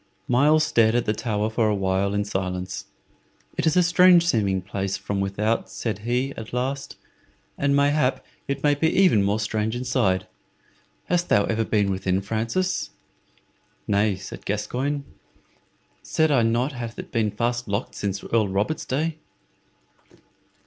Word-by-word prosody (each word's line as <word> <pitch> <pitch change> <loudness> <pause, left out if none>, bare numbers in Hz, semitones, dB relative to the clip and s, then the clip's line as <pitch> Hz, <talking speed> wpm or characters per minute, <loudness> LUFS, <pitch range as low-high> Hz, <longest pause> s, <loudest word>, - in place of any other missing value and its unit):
Myles 150 +5 +4
stared 115 -5 +3
at 120 - +1
the 105 - +1
tower 110 -1 -1
for 110 -1 +2
a 105 - +1
while 95 +1 0
in 105 0 0
silence. 95 -2 -3 0.7
"It - - 0
is 160 - +2
a 180 - +6
strange 175 0 +6
seeming 100 - +1
place 95 0 -3
from 100 -1 -3
without," 105 +4 -1
said 110 -4 -4
he, 125 +5 -1
at 110 -4 -9
last, 135 +2 -3 0.6
"and 140 0 +1
mayhap 140 -2 +2 0.2
it 140 0 -3
may 145 -1 +4
be 160 +3 +1
even 180 - +4
more 100 +2 +1
strange 110 +1 -1
inside. 120 -7 0 0.8
Hast 175 0 0
ever 110 +2 +2
been 105 -3 +1
within, 95 0 0
Francis?" 115 - -1 1.0
"Nay," 100 0 +2
said 95 +1 -9
Gascoyne; 135 +7 -2 1.0
"said 160 -1 +1
I 135 -4 +4
not 120 +4 +1
it - - -12
hath 120 -1 -6
been 110 -2 +1
fast 120 +3 -2
locked 100 +4 -2
since 100 -1 -3
Earl 110 -3 +1
Robert's 100 +11 -1
day?" 155 +4 -1
115 Hz, 150 wpm, -24 LUFS, 100-140 Hz, 1.0 s, a